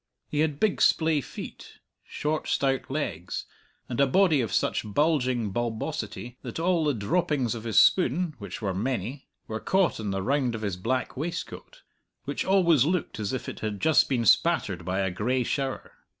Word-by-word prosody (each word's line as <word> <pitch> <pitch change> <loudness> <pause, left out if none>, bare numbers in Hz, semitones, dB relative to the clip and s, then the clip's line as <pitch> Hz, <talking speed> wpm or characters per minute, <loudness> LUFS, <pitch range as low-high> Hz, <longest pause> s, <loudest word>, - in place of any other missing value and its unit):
He 150 - -2
had 150 -2 +1
big 215 -2 +1
splay 160 -2 +3
feet, - - -9 0.3
short 155 +1 -3
stout 135 -1 0
legs, 135 - -3 0.4
and 125 +2 -1
a 140 - +5
body 160 -1 +4
of 110 -5 -3
such - - +1
bulging 125 -2 +1
bulbosity 115 +1 -4
that - - -6
all 170 -1 +2
the 145 -3 +1
droppings 135 - 0
of 115 -1 -7
his 110 - +4
spoon 175 0 +3
which 100 +2 -7
were 95 -2 0
many 125 +5 -3 0.2
were 110 0 -4
caught 190 -1 +1
on 105 -2 -3
the 95 -1 -2
round 130 -1 +1
of 110 - -6
his 100 -3 -1
black 130 +8 -2
waistcoat, 175 - -6 0.4
which - - -2
always 175 -8 +4
looked 165 -7 -1
as 105 -2 -2
if 130 -3 -4
it - - -6
had 105 -2 -3
just 160 +6 +4
been 120 -4 0
spattered 105 - +3
by 95 +2 0
a 95 -1 0
gray 125 +8 0
shower. 135 +1 -3
130 Hz, 180 wpm, -27 LUFS, 110-155 Hz, 0.4 s, a